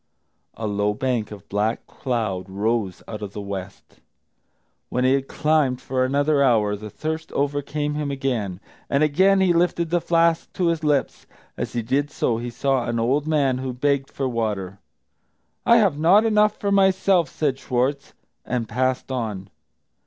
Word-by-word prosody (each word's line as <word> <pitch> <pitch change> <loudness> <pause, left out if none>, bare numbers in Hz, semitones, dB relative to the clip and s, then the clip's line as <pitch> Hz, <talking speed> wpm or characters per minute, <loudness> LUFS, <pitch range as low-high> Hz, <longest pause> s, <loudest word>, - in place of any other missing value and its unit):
A 110 - -5
low 105 0 0
bank 125 -3 -1
of 105 -2 -11
black 105 +3 -1
cloud 110 -7 -3
rose 100 -1 -1
out 105 -1 -6
of 100 -1 -6
the - - -6
west. 100 -1 -8 0.9
When 125 - 0
he 130 +1 +4
had 135 0 0
climbed 150 -5 +1
for 130 -1 -1
another 145 +2 +2
hour, 110 -6 +3
the 105 +1 -8
thirst 160 +6 -5
overcame 145 +1 -1
him 150 -1 -2
again, 125 -9 -2 0.3
and 140 +2 +2
again 190 +6 +4
he 185 -2 +4
lifted 170 -1 +1
the 175 -1 +2
flask 165 -1 +2
to 175 -2 +1
his 165 -1 -1
lips. 145 -3 0 0.3
As - - -4
he 120 -1 -1
did 140 +5 0
so, 115 -5 -1
he 120 +1 -4
saw 130 +1 0
an 115 0 -1
old 135 +6 +1
man 140 -5 +2
who 130 -1 -3
begged 135 +1 0
for 135 - -3
water. 105 -6 -3 0.9
"I 235 - +7
have 195 -10 +2
not 190 +8 +5
enough 210 -1 +3
for 200 - -2
myself," 190 -4 +3
said 140 -4 -1
Schwartz, 135 +3 -1 0.3
and 120 -2 -2
passed 130 +3 -1
on. 105 -6 -4
135 Hz, 165 wpm, -23 LUFS, 115-155 Hz, 0.9 s, I